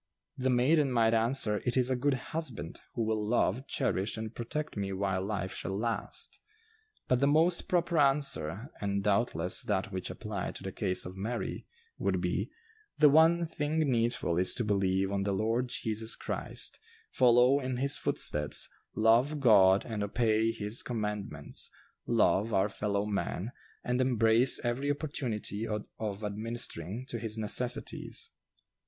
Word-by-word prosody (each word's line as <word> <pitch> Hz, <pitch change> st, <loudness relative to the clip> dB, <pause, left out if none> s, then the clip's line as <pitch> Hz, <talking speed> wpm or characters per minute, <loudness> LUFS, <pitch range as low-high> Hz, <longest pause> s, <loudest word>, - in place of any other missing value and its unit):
The 130 Hz, 0 st, 0 dB
maiden 135 Hz, +3 st, +3 dB
might 115 Hz, -2 st, +3 dB
answer, 115 Hz, -2 st, +2 dB
'It 125 Hz, +1 st, 0 dB
is 130 Hz, 0 st, +2 dB
a -, -, +2 dB
good 135 Hz, +2 st, +1 dB, 0.2 s
husband, 135 Hz, -, -4 dB
who 115 Hz, -, 0 dB
will 110 Hz, -1 st, 0 dB
love, 120 Hz, +3 st, +1 dB
cherish 105 Hz, -5 st, -1 dB
and 110 Hz, 0 st, -5 dB
protect 150 Hz, +7 st, -4 dB
me 100 Hz, -2 st, -2 dB
while 95 Hz, -1 st, -1 dB
life 95 Hz, -2 st, -3 dB
shall 95 Hz, +3 st, -4 dB
last.' 115 Hz, +2 st, -3 dB, 0.7 s
But 125 Hz, -, +3 dB
the 140 Hz, -, +3 dB
most 165 Hz, +4 st, +3 dB
proper 175 Hz, -2 st, +1 dB
answer, 135 Hz, -, +1 dB
and 100 Hz, -1 st, -1 dB
doubtless 105 Hz, -2 st, 0 dB
that 105 Hz, +1 st, -1 dB
which 95 Hz, -1 st, -3 dB
applied 100 Hz, +1 st, -5 dB
to -, -, -8 dB
the 95 Hz, -, -4 dB
case 90 Hz, 0 st, -1 dB
of 90 Hz, +1 st, -7 dB
Mary, 110 Hz, +5 st, -4 dB, 0.3 s
would -, -, 0 dB
be, -, -, -1 dB, 0.5 s
'The 150 Hz, -, +7 dB
one 165 Hz, +3 st, +5 dB
thing 155 Hz, -1 st, -2 dB
needful 115 Hz, -7 st, +1 dB
is 90 Hz, -, +4 dB
to 120 Hz, -, 0 dB
believe 95 Hz, -2 st, +1 dB
on 100 Hz, 0 st, 0 dB
the 100 Hz, 0 st, 0 dB
Lord 115 Hz, +5 st, 0 dB
Jesus 110 Hz, -1 st, -2 dB
Christ, -, -, -4 dB, 0.3 s
follow 125 Hz, +2 st, +5 dB
in 130 Hz, -2 st, -3 dB
his 140 Hz, +3 st, +1 dB
footsteps, 75 Hz, 0 st, 0 dB, 0.3 s
love 120 Hz, +7 st, +3 dB
God 100 Hz, -7 st, +6 dB
and 110 Hz, -3 st, -4 dB
obey 110 Hz, +1 st, +2 dB
His 110 Hz, 0 st, -4 dB
commandments, 105 Hz, -10 st, -4 dB, 0.4 s
love 110 Hz, +4 st, +3 dB
our 95 Hz, +2 st, +3 dB
fellow 100 Hz, 0 st, -1 dB
man, 105 Hz, +1 st, -2 dB, 0.3 s
and 125 Hz, +1 st, 0 dB
embrace 120 Hz, 0 st, +4 dB
every 125 Hz, +4 st, -1 dB
opportunity 125 Hz, -7 st, -3 dB
of 105 Hz, -1 st, -5 dB
administering 110 Hz, -1 st, -4 dB
to 115 Hz, -, -3 dB
his 110 Hz, -1 st, -4 dB
necessities. 115 Hz, +3 st, -1 dB
115 Hz, 150 wpm, -31 LUFS, 100-130 Hz, 0.7 s, The